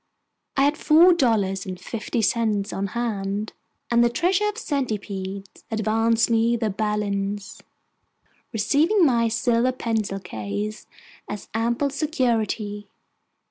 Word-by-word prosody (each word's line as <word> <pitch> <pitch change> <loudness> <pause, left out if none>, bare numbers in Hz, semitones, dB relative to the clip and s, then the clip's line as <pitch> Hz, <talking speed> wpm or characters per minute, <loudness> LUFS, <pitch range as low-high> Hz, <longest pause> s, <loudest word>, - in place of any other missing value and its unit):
I 270 - +4
had 290 +2 +2
four 335 +4 +6
dollars 210 - +1
and 185 -1 -5
fifty 230 0 -3
cents 215 -3 +1
on 195 +1 -2
hand, 210 -3 -2 0.4
and 235 0 +5
the 240 - +4
treasurer 365 - +1
of 420 - -5
the - - -6
Centipedes 200 - -4
advanced 225 +1 +2
me 230 0 +2
the 225 -3 -1
balance, 205 -1 -2 0.9
receiving 305 - +3
my 235 -4 +3
silver 235 +2 +2
pencil 220 -5 -2
case 185 - -5 0.4
as 210 - -6
ample 235 +5 0
security. 230 -8 -1
225 Hz, 120 wpm, -24 LUFS, 205-250 Hz, 0.9 s, four